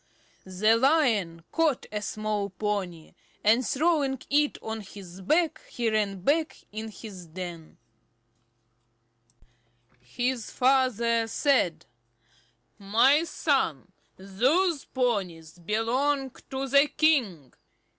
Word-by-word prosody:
The 210 +4 +3
Lion 230 - +2
caught 315 -6 +1
a 210 0 -3
small 210 -1 -3
pony, 185 -4 -4 0.3
and 225 +5 +4
throwing 280 -1 +1
it 295 +1 +2
on 220 0 -4
his 190 -2 -11
back, 315 - +1
he 235 -2 -1
ran 200 -3 -1
back 305 - 0 0.2
to 220 +1 -5
his 200 -5 -10
den. 170 -1 -8 2.2
His 240 - -3
father 235 -3 +2
said: 220 - +1 0.9
"My 240 +10 +3
son, 260 - -1 0.3
those 270 - +1
ponies 180 -10 -2
belong 255 - 0 0.2
to 270 0 -3
the 280 +2 +5
king. 230 - +1
225 Hz, 95 wpm, -27 LUFS, 190-270 Hz, 2.2 s, the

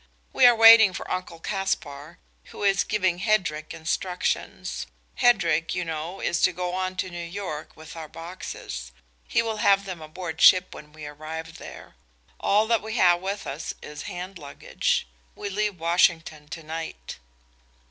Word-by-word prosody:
"We - - +7
are 240 - +6
waiting 225 -3 +9
for - - -6
Uncle 180 -2 -4
Caspar, 165 -5 -3 0.3
who - - -9
is 195 -1 +3
giving 185 -4 0
Hedrick 180 -7 0
instructions. 180 +3 -3 0.3
Hedrick, 175 -10 +3
you 180 - -2
know, 165 +3 -5
is 170 - 0
to - - +4
go 180 0 -4
on 185 0 -2
to 185 0 -3
New 175 0 -6
York 170 -3 -6
with 160 +1 -11
our 160 -1 -7
boxes. 160 - -8 0.4
He - - +2
will 225 -1 -3
have 200 -1 +3
them 185 -4 -6
aboard 160 +1 -7
ship 185 0 +6
when 150 0 -12
we 155 0 -10
arrive 160 +2 -8
there. - - -11 0.5
All 210 +2 +3
that 230 -1 +2
we 220 +2 -5
have 175 -5 +4
with 195 +2 -4
us 140 +4 -5
is 150 +5 -7
hand 180 0 -7
luggage. 140 - -2 0.3
We 205 - -5
leave 205 -2 -1
Washington 165 -2 +1
to 165 +1 -8
night." 155 - -7
175 Hz, 160 wpm, -25 LUFS, 160-195 Hz, 0.5 s, waiting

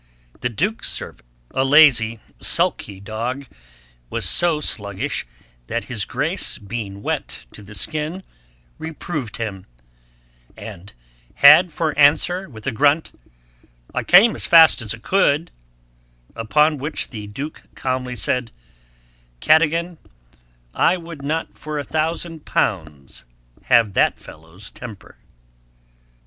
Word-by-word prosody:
The 125 - -2
Dukes 200 - -1
servant, - - -4 0.2
a 130 - 0
lazy 135 -6 +5 0.2
sulky 95 -2 -1
dog, 115 +7 -5 0.6
was - - +1
so 170 -3 +3
sluggish, 100 - -2 0.4
that - - -3
his - - -2
Grace - - +1
being 100 -2 -7
wet - - -4
to - - -13
the 105 +1 -11
skin, 155 - -1 0.6
reproved 155 -6 -5
him, 100 -5 -6 0.9
and 95 +4 -10 0.4
had 155 +5 +7
for 155 -1 -2
answer 175 +6 +3
with 110 -5 -12
a 135 - 0
grunt, 145 +6 +2 0.8
'I - - -2
came 200 +6 +6
as - - 0
fast 165 -5 +7
as 110 0 0
I - - -15
could,' 165 +3 +1 0.8
upon 150 +7 +2
which 150 +4 -4
the 105 -4 -7
Duke 135 +9 -7
calmly 130 -1 -3
said, 120 +1 -1 0.9
'Cadogan, 165 - +2 0.7
I 180 - +2
would 165 -4 -10
not 155 +4 -3
for 150 0 -6
a 145 - -2
thousand 160 +1 -3
pounds 75 - -3 0.4
have 115 -4 +3
that - - +2
fellow's 80 +5 -11
temper!' 115 -6 -11
140 Hz, 120 wpm, -20 LUFS, 110-160 Hz, 0.9 s, had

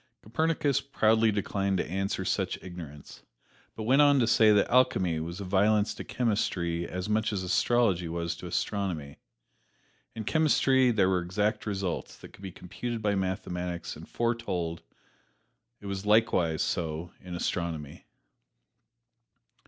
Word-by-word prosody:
Copernicus 145 +4 0
proudly 110 -4 +3
declined 100 -1 -1
to - - -1
answer 95 +4 -2
such - - -1
ignorance, 80 -6 -10 0.5
but 110 - -5
went 130 +6 +4
on 145 -1 +6
to 125 - +3
say 110 -1 +5
that 105 -1 +4
alchemy 95 -10 +2
was 85 +4 -5
a - - -4
violence 105 +3 +2
to - - -7
chemistry 85 -7 -1
as 90 +1 -4
much 110 +1 +1
as 95 -3 -2
astrology 95 -1 +2
was 85 0 -2
to - - -8
astronomy. 90 -9 -3 1.0
In 110 - -4
chemistry 135 -2 +3
there 105 -5 +3
were 95 -1 +2
exact 105 +5 -1
results 95 -4 -3
that - - -13
could - - -16
be 95 -2 -6
computed 110 +6 -6
by 105 -1 +2
mathematics 90 -2 -3
and - - -12
foretold; 105 -9 -2 1.0
it - - -14
was 100 -1 -4
likewise 105 -7 +3
so 80 +1 -3
in 90 -1 -7
astronomy. 85 -4 -3
100 Hz, 140 wpm, -28 LUFS, 90-110 Hz, 1.0 s, on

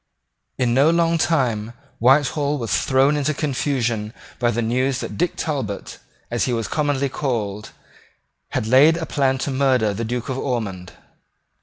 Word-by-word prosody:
In 125 -2 +1
no 140 +5 +5
long 170 0 +2
time 120 -10 0 0.3
Whitehall 140 +3 +3
was 115 -5 -1
thrown 135 +3 +3
into 145 +1 0
confusion 125 -7 -1 0.2
by 120 0 +2
the 120 0 -1
news 130 +3 0
that - - -5
Dick 175 +1 -1
Talbot, 130 -10 -4 0.3
as 120 - 0
he 125 - -1
was 115 -2 -2
commonly 145 -2 0
called, 110 -7 -3 0.8
had - - -2
laid 140 +8 +5
a 165 - -3
plan 135 -3 +1
to 140 - -3
murder 130 -6 +2
the 110 +4 -4
Duke 120 +1 -3
of 130 -1 -3
Ormond. 100 -10 -3
130 Hz, 155 wpm, -21 LUFS, 115-145 Hz, 0.8 s, no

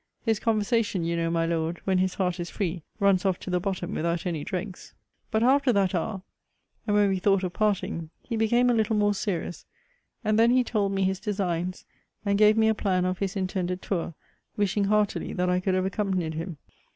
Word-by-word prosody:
His 225 -3 +2
conversation, 215 -3 +1
you 170 +1 -1
know, 165 0 0
my 165 0 +1
Lord, 165 0 -1
when 190 -1 +1
his 185 0 0
heart 180 -2 -1
is 175 0 -4
free, 180 -3 -3 0.2
runs 200 -3 +3
off 190 -2 +1
to 185 - -5
the 180 - +2
bottom 180 -1 -3
without 170 +2 -1
any 165 -5 -2
dregs. 185 +2 -6 0.3
But 220 +1 +1
after 265 +1 +4
that 195 -2 +2
hour, 190 +2 -2 0.6
and 205 - +2
when 205 -1 +4
we 190 -1 0
thought 195 0 +2
of 180 -1 -2
parting, 195 -6 -1
he 235 - -4
became 240 +3 +3
a - - +3
little 220 -1 +1
more 205 0 +3
serious: 180 -4 -3 0.6
and 215 0 +2
then 230 +1 +6
he 250 +1 +4
told 210 -5 0
me 195 -1 0
his 190 0 0
designs, 185 -3 -2 0.4
and 200 0 +1
gave 215 +1 +6
me 220 0 +4
a 220 - +4
plan 185 -4 0
of 185 0 -1
his 195 -1 -2
intended 185 -1 -2
tour; 170 -4 -2 0.4
wishing 205 0 +1
heartily 210 0 +1
that 180 0 0
I 180 - +2
could 185 0 0
have 185 0 +1
accompanied 190 -5 -1
him. 165 +1 -5
190 Hz, 210 wpm, -26 LUFS, 180-210 Hz, 0.6 s, then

